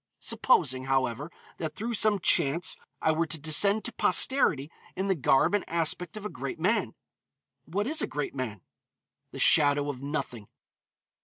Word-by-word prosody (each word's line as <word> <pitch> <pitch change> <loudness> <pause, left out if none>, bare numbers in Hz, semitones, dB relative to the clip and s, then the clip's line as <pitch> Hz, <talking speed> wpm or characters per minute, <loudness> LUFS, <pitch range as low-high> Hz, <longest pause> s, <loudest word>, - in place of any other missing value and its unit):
Supposing, 130 0 +1
however, 135 +3 -1 0.3
that 155 -2 -5
through 235 +3 -4
some 215 -1 +3
chance 165 0 +2 0.3
I 160 - +3
were 160 +1 -1
to 160 0 -3
descend 200 +8 +3
to 240 - -2
posterity 180 - +2 0.2
in 195 +1 -3
the - - +4
garb 135 0 +2
and 205 - +1
aspect 170 +2 -2
of 210 - -8
a - - 0
great 140 -6 -7
man. 185 - 0 0.7
What 195 +6 -3
is 310 +4 0
a - - -1
great 145 -1 -4
man? 120 -8 -5 0.7
The - - -9
shadow 145 -1 +4
of 130 -2 -11
nothing. 135 -7 -5
160 Hz, 160 wpm, -27 LUFS, 135-200 Hz, 0.7 s, the